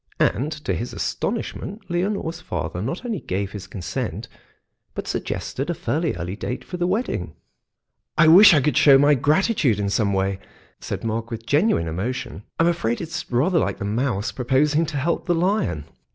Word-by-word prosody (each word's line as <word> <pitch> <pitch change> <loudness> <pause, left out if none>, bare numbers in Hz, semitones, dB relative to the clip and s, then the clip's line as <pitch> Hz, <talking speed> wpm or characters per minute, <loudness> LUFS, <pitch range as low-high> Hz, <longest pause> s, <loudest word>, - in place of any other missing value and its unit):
And 135 +9 +1
to 95 - 0
his 105 +8 -4
astonishment 205 +3 -3
Leonore's 175 -1 -2
father 90 - -4
not 135 - -4
only 230 -5 -2
gave 95 +1 -3
his 100 -2 -8
consent, 90 - -4 0.7
but - - -5
suggested 135 +5 -3
a 175 - 0
fairly 160 +2 -1
early 90 +2 -4
date 125 +4 -4
for 180 - -6
the 175 0 0
wedding. 215 +7 -2 0.8
"I 165 - +6
wish 175 +2 +9
I 145 - +4
could 150 +3 +1
show 140 -2 +7
my 145 +2 +5
gratitude 145 - +2
in 100 -1 -1
some 105 -1 +1
way," 95 0 0 0.4
said - - -5
Mark 115 +1 -2
with 115 -1 -6
genuine 145 - +2
emotion. 115 +7 -4 0.2
"I'm 165 - +5
afraid 165 -9 0
it's 170 +1 -5
rather 165 +9 +3
like - - -1
the - - -5
mouse 110 0 -1
proposing 145 +5 +1
to 150 -2 -4
help 155 +6 -1
the 175 - +3
lion." 170 - 0
140 Hz, 175 wpm, -23 LUFS, 105-170 Hz, 0.8 s, wish